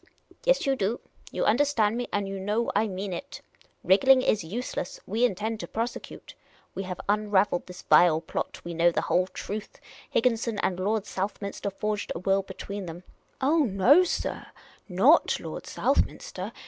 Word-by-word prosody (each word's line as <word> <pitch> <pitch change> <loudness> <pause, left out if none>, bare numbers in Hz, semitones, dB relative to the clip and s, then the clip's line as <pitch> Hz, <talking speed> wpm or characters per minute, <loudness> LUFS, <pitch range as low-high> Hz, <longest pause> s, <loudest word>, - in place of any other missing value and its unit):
" - - -25
Yes - - +3
you 275 -1 +2
do. 215 0 -1 0.3
You - - -1
understand 230 -3 +2
me, 245 0 -3
and 205 -1 -1
you 195 0 -5
know 210 +5 -1
I 215 +2 +3
mean 190 -1 -4
it. 280 +10 -7 0.4
Wriggling 255 +7 +5
is 210 - +1
useless; 195 +1 -5
we 220 +5 -1
intend 220 +1 -2
to - - -6
prosecute. 230 +2 -5 0.4
We - - -4
have 180 - -5
unravelled 205 -3 +1
this 180 -1 -10
vile 165 -3 +5
plot. 160 - -5
We 170 - -6
know 170 +1 +4
the - - 0
whole 180 +1 +2
truth. 210 +2 -7 0.3
Higgin 240 -3 +2
son 230 -2 -3
and 185 -1 0
Lord 210 +2 0
Southminster 200 +1 -4
forged 210 +1 -3
a - - -2
will 195 +3 +1
between 195 0 -7
them 170 +2 -8 0.2
" - - -40
" - - -39
Oh, 280 - +4
sir, - - -3 0.4
not 225 - +4
Lord - - -7
Southminster - - -1
205 Hz, 175 wpm, -27 LUFS, 190-235 Hz, 0.4 s, Wriggling